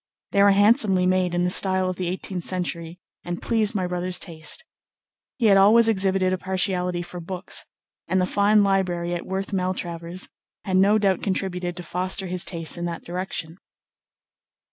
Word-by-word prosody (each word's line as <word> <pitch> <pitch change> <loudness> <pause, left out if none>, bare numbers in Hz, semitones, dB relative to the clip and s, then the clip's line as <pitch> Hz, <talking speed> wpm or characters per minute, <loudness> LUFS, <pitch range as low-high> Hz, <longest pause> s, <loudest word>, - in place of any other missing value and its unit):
They 200 - +3
were 200 - +7
handsomely 200 -2 +4
made 185 -1 +1
in 175 - +1
the 180 - +1
style 190 0 +3
of 185 - -2
the 180 0 -3
eighteenth 185 0 -4
century 175 -2 -4 0.3
and 175 0 -4
pleased 225 -1 0
my 185 -2 0
brother's 180 0 -2
taste. 165 - -3 0.7
He 235 - 0
had 200 -2 +6
always 220 +4 +6
exhibited 190 -3 +2
a 185 - -2
partiality 180 -2 -1
for 175 +1 -8
books, 180 +2 -3 0.4
and 190 - +1
the 180 - +2
fine 205 +2 +3
library 180 -3 0
at 175 - -5
Worth 190 +1 -4
Maltravers 180 -1 -3 0.4
had 190 -2 +1
no 200 +3 +5
doubt 195 -3 +1
contributed 180 -3 -2
to 180 - -6
foster 185 +2 -2
his 180 0 -1
tastes 170 -2 -2
in 175 - -3
that 170 -1 -5
direction. 175 -1 -5
185 Hz, 170 wpm, -24 LUFS, 175-195 Hz, 0.7 s, were